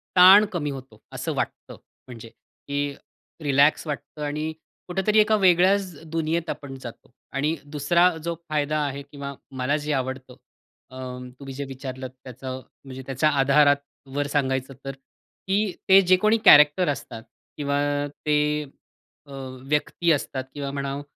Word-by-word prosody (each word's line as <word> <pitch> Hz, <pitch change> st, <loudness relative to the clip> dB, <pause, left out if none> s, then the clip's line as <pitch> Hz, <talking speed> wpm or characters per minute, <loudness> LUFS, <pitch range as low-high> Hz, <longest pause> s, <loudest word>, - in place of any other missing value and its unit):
ताण 190 Hz, +3 st, +9 dB
कमी 155 Hz, -4 st, -2 dB
होतो, 130 Hz, -5 st, -10 dB
असं -, -, -3 dB
वाटतं. -, -, -4 dB, 0.3 s
म्हणजे, 115 Hz, -2 st, -10 dB, 0.4 s
की 145 Hz, 0 st, -1 dB, 0.5 s
रिलॅक्स 145 Hz, +3 st, +3 dB
वाटतं 145 Hz, +1 st, -6 dB
आणि 150 Hz, +2 st, -2 dB, 0.4 s
कुठेतरी 190 Hz, +4 st, +2 dB
एका 215 Hz, +1 st, +4 dB
वेगळ्याच 185 Hz, 0 st, +3 dB, 0.2 s
दुनियेत 165 Hz, +1 st, -1 dB
आपण 140 Hz, -3 st, -6 dB
जातो 120 Hz, 0 st, -10 dB, 0.2 s
आणि 150 Hz, +4 st, 0 dB, 0.2 s
दुसरा 170 Hz, +5 st, +4 dB
जो 170 Hz, 0 st, -2 dB
फायदा 155 Hz, 0 st, 0 dB
आहे 140 Hz, 0 st, -4 dB
किंवा 140 Hz, 0 st, -8 dB, 0.3 s
मला 135 Hz, +4 st, +1 dB
जे 150 Hz, 0 st, -4 dB
आवडतं, 130 Hz, -1 st, -3 dB, 0.6 s
अ, -, -, -12 dB, 0.4 s
तुम्ही 135 Hz, -1 st, -8 dB
जे 140 Hz, +2 st, -5 dB
विचारलत 130 Hz, -1 st, -7 dB
त्याचं, 130 Hz, +1 st, -7 dB, 0.2 s
म्हणजे 130 Hz, -1 st, -8 dB
त्याच्या 135 Hz, +3 st, +1 dB
आधारावर 145 Hz, 0 st, +2 dB
सांगायचं 135 Hz, -1 st, 0 dB
तर, 135 Hz, -, -3 dB, 0.6 s
की 200 Hz, +1 st, +1 dB, 0.2 s
ते 190 Hz, +1 st, +9 dB
जे 185 Hz, 0 st, +5 dB
कोणी 215 Hz, +4 st, +3 dB
कॅरेक्टर 150 Hz, +4 st, +7 dB
असतात 120 Hz, -5 st, -5 dB, 0.3 s
किंवा 145 Hz, -1 st, 0 dB, 0.3 s
ते, 150 Hz, +1 st, 0 dB, 0.6 s
अ, 140 Hz, -, -16 dB, 0.4 s
व्यक्ती 150 Hz, +3 st, +1 dB
असतात 135 Hz, -3 st, -1 dB
किंवा 140 Hz, -1 st, -4 dB
म्हणाव 140 Hz, 0 st, -3 dB
145 Hz, 135 wpm, -24 LUFS, 135-160 Hz, 0.6 s, ताण